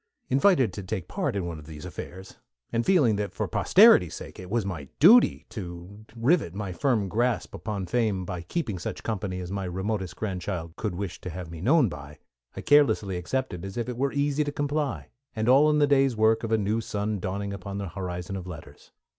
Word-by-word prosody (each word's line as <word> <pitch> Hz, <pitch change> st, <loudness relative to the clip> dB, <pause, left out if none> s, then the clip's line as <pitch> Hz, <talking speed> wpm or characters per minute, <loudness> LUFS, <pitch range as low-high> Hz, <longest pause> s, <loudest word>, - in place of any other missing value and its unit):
Invited 135 Hz, -, +3 dB
to 100 Hz, -, -5 dB
take 95 Hz, -2 st, -4 dB
part -, -, -2 dB
in 95 Hz, -3 st, -1 dB
one 85 Hz, -2 st, -5 dB
of 75 Hz, -, -13 dB
these 75 Hz, -2 st, -9 dB
affairs, 95 Hz, +1 st, -9 dB, 0.3 s
and 115 Hz, 0 st, +1 dB
feeling 140 Hz, -, +3 dB
that 105 Hz, 0 st, -3 dB
for -, -, -2 dB
posterity's -, -, +5 dB
sake -, -, -9 dB
it 90 Hz, -1 st, -9 dB
was 115 Hz, -1 st, 0 dB
my 80 Hz, -8 st, -5 dB
duty 220 Hz, -, +6 dB
to 95 Hz, +1 st, -8 dB
rivet 120 Hz, -, +1 dB
my 100 Hz, -2 st, -4 dB
firm 115 Hz, 0 st, +1 dB
grasp 120 Hz, +4 st, 0 dB
upon 100 Hz, -3 st, -4 dB
Fame 105 Hz, -2 st, 0 dB
by 90 Hz, -1 st, -5 dB
keeping 105 Hz, -, -3 dB
such -, -, -5 dB
company 100 Hz, -4 st, -3 dB
as 90 Hz, 0 st, -6 dB
my 100 Hz, 0 st, -3 dB
remotest 95 Hz, +1 st, -3 dB
great -, -, -4 dB
grandchild 90 Hz, -3 st, -4 dB
could 105 Hz, -5 st, -3 dB
wish 95 Hz, -1 st, -5 dB
to 90 Hz, -, -6 dB
have 85 Hz, 0 st, -7 dB
me 80 Hz, -1 st, -8 dB
known 135 Hz, -, +4 dB
by, 75 Hz, -3 st, -9 dB, 0.4 s
I -, -, -5 dB
carelessly 110 Hz, -10 st, +3 dB
accepted 90 Hz, 0 st, -3 dB
as 95 Hz, +2 st, -7 dB
if 120 Hz, -, -2 dB
it 125 Hz, -, -4 dB
were 135 Hz, +3 st, 0 dB
easy 145 Hz, +1 st, +1 dB
to 145 Hz, -, -3 dB
comply, 145 Hz, 0 st, -2 dB, 0.3 s
and 110 Hz, 0 st, -1 dB
all 140 Hz, +4 st, +6 dB
in 150 Hz, -, +3 dB
the 145 Hz, -, +5 dB
day's 135 Hz, -4 st, +3 dB
work 110 Hz, +1 st, +3 dB
of 115 Hz, -, -3 dB
a 110 Hz, -, +4 dB
new 105 Hz, +2 st, 0 dB
sun 105 Hz, -1 st, -2 dB
dawning 100 Hz, +2 st, -3 dB
upon 100 Hz, 0 st, -6 dB
the 100 Hz, -2 st, -4 dB
horizon 90 Hz, +1 st, -5 dB
of 95 Hz, -1 st, -6 dB
letters. 90 Hz, -4 st, -11 dB
100 Hz, 215 wpm, -26 LUFS, 90-125 Hz, 0.4 s, duty